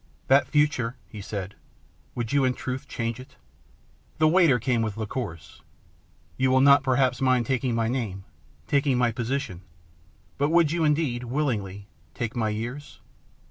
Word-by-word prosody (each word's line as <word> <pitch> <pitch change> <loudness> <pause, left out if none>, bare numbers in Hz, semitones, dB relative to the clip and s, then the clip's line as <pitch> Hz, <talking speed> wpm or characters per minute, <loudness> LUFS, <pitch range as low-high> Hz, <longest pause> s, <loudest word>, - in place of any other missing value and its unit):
" - - -37
That 140 - +5
future," 145 -5 +1
he 105 +3 -9
said, 100 -1 -5 0.3
" - - -35
would 120 -1 -3
you 140 -1 +3
in 130 -1 +1
truth 130 +2 -5
change 115 -3 -3
it? 130 +1 -13 0.4
" - - -35
The 155 - +4
waiter 165 -5 +5
came 120 0 0
with 110 -2 -3
liqueurs. 105 - -6 0.4
" - - -34
You 130 0 +2
will 130 0 +4
not 140 +1 +6
perhaps 130 -1 +1
mind 130 -2 +3
taking 130 -2 0
my 115 -1 +1
name, 110 -6 -3 0.4
taking 140 - +1
my 120 -1 +2
position, 120 -5 -3 0.8
but 145 +1 +2
would 165 -2 +4
you 170 0 0
indeed 145 -5 0
willingly 110 -8 -2 0.3
take 120 0 -4
my 110 -3 0
years 120 +7 -6
125 Hz, 170 wpm, -25 LUFS, 115-140 Hz, 0.8 s, not